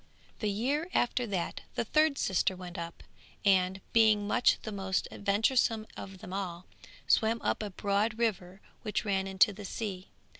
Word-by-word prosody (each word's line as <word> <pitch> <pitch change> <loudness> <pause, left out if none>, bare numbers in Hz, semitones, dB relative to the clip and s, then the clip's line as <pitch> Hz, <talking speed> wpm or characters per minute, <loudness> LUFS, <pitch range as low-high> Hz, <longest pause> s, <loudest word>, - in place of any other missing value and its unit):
The 210 - 0
year 275 - -1
after 245 0 +1
that 185 -5 -3
the - - 0
third 305 +3 +3
sister 190 -3 +1
went 180 -1 -9
up, 170 0 -7 0.4
and, 190 -1 +3
being 220 -2 +5
much 245 - +3
the 220 - -5
most 190 -2 -1
venturesome 220 +2 +1
of 195 -1 -8
them 180 - -8
all, 185 -2 -4 0.4
swam 225 +1 +3
up - - 0
a 210 - -3
broad 205 +3 0
river 195 -5 -2 0.2
which 215 -1 -2
ran 195 -2 0
into 190 +2 +4
the 205 +1 -9
sea. 195 -2 -5
200 Hz, 160 wpm, -31 LUFS, 190-225 Hz, 0.4 s, being